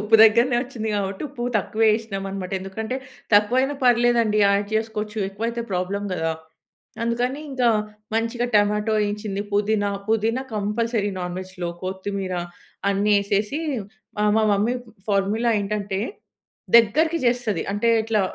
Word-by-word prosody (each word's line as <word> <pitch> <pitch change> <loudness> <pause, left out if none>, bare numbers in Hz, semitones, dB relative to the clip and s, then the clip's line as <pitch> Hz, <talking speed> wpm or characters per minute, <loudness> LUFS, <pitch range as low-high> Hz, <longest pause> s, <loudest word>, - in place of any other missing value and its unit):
ఉప్పు 210 +2 +5
దగ్గరనే 235 +3 +5
వచ్చింది 245 -4 -4
కాబట్టి 195 -1 -2
ఉప్పు 250 -3 -7
తక్కువే 215 +3 +1
వేసినామనమాట 195 -4 -4
ఎందుకంటే 220 +6 -4 0.4
తక్కువైనా 250 +7 +4
పర్లేదండి 240 -3 +4
యాడ్ 200 0 +3
చేసుకోవచ్చు, 220 -1 -2
ఎక్కువైతే 230 +4 -3
ప్రాబ్లమ్ 195 +2 -2
కదా! 165 -2 0 0.7
అందుకని 245 +4 -1
ఇంకా 255 -3 +2 0.5
మంచిగా 230 +2 0
టమాటో, 210 +1 +3 0.3
చిల్లీ, 200 -2 -3
పుదీనా, 205 0 +1 0.2
పుదీనా 225 +3 +1
కంపల్సరీ 210 +1 0
నాన్‍వెజ్‍లో 180 0 -5
కొత్తిమీర 190 0 -3 0.5
అన్ని 200 +1 +2
వేసేసి, 205 +6 0 0.6
ఆహ్, 210 0 +3
మా 220 - +3
మమ్మీ 210 +5 +1 0.3
ఫార్ములా 205 +4 +1
ఏంటంటే, 200 -1 -2 0.8
దగ్గరికి 310 +9 +4
చేస్తది, 240 -3 +1
అంటే 205 +3 +1
ఇట్లా 220 -1 +1
210 Hz, 120 wpm, -23 LUFS, 200-235 Hz, 0.8 s, ఉప్పు